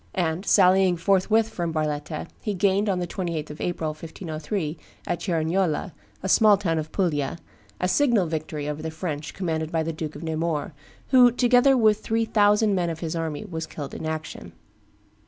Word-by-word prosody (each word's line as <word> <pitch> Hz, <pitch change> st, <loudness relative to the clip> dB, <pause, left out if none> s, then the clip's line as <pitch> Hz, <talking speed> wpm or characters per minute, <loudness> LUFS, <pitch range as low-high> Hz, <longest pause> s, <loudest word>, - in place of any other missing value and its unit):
And 175 Hz, +1 st, -1 dB
sallying 185 Hz, -2 st, +5 dB
forthwith 200 Hz, +5 st, +2 dB
from 175 Hz, -6 st, -3 dB
Barletta, 155 Hz, -1 st, -2 dB, 0.2 s
he 210 Hz, -2 st, -2 dB
gained, 200 Hz, +2 st, +2 dB
on 190 Hz, -, +1 dB
the 180 Hz, -, -1 dB
28th 170 Hz, -4 st, -4 dB
of 150 Hz, -, -9 dB
April, 170 Hz, -3 st, -2 dB
1503, 155 Hz, +1 st, -5 dB, 0.3 s
at 175 Hz, -, -2 dB
Cerignola, 170 Hz, 0 st, 0 dB, 0.3 s
a -, -, -1 dB
small 210 Hz, +1 st, +6 dB
town 165 Hz, -5 st, 0 dB
of 155 Hz, 0 st, -6 dB
Puglia, 160 Hz, -6 st, -1 dB, 0.4 s
a 180 Hz, -, +1 dB
signal 235 Hz, -3 st, +3 dB
victory 155 Hz, -2 st, -4 dB
over 150 Hz, +1 st, -4 dB
the 160 Hz, -, -3 dB
French 155 Hz, -2 st, -5 dB
commanded 160 Hz, -4 st, -2 dB
by 165 Hz, -2 st, 0 dB
the 165 Hz, +1 st, -3 dB
Duke 155 Hz, -1 st, -5 dB
of 145 Hz, -, -8 dB
Nemours, 160 Hz, -1 st, -2 dB, 0.4 s
who, 250 Hz, -2 st, +7 dB
together 245 Hz, +2 st, +4 dB
with 215 Hz, -3 st, +4 dB
three 225 Hz, 0 st, 0 dB
thousand 210 Hz, -1 st, +3 dB
men 175 Hz, -3 st, 0 dB
of 165 Hz, -1 st, -5 dB
his 165 Hz, 0 st, -3 dB
army, 165 Hz, +2 st, -3 dB
was 160 Hz, -5 st, -5 dB
killed 145 Hz, -3 st, -7 dB
in 160 Hz, -, -5 dB
action. 155 Hz, 0 st, -6 dB
170 Hz, 175 wpm, -25 LUFS, 155-200 Hz, 0.4 s, who